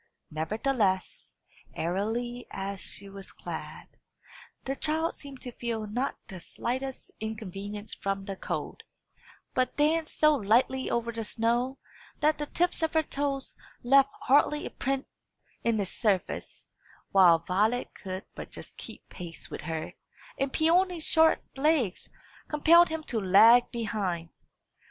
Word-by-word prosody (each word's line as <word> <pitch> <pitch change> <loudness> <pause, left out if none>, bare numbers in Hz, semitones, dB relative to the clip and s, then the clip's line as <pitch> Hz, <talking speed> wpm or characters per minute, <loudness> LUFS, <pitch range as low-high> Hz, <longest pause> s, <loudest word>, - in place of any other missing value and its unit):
Nevertheless, 195 - -1 0.4
airily 225 +8 -2
as 195 0 -5
she 200 - -5
was 195 0 -9
clad, - - -7 0.8
the 270 - -1
child 315 +3 +1
seemed 275 -3 -9
to 250 - -6
feel 230 -2 -3
not 245 +6 -2
the 190 - -8
slightest 260 +8 -4
inconvenience 210 -1 -6
from 195 0 -3
the 195 -1 -4
cold, - - -4 0.7
but 255 -1 0
danced 310 +2 +2
so 305 0 +6
lightly 260 +2 +2
over 235 0 0
the 225 -1 -4
snow 240 +4 0 0.4
that 305 +1 +2
the 295 - -2
tips 350 +3 0
of 320 0 0
her 320 - +4
toes 280 -2 -2 0.3
left 275 +2 +6
hardly 295 +2 +3
a - - -5
print 270 0 -2 0.6
in 230 -2 +2
its 195 -2 -2
surface; 200 -5 -1 0.4
while 180 -4 +7
Violet 205 +8 0
could 185 0 -6
but - - -8
just - - -8
keep - - -10
pace 170 -3 -8
with - - -5
her, 160 0 -4 0.4
and 275 0 -1
Peony's 340 +2 +2
short 320 0 +5
legs 275 - +1 0.4
compelled 335 +3 +6
him 320 0 -3
to 240 -6 -2
lag 225 +6 +7
behind. 200 -8 -2
235 Hz, 135 wpm, -29 LUFS, 200-280 Hz, 0.8 s, while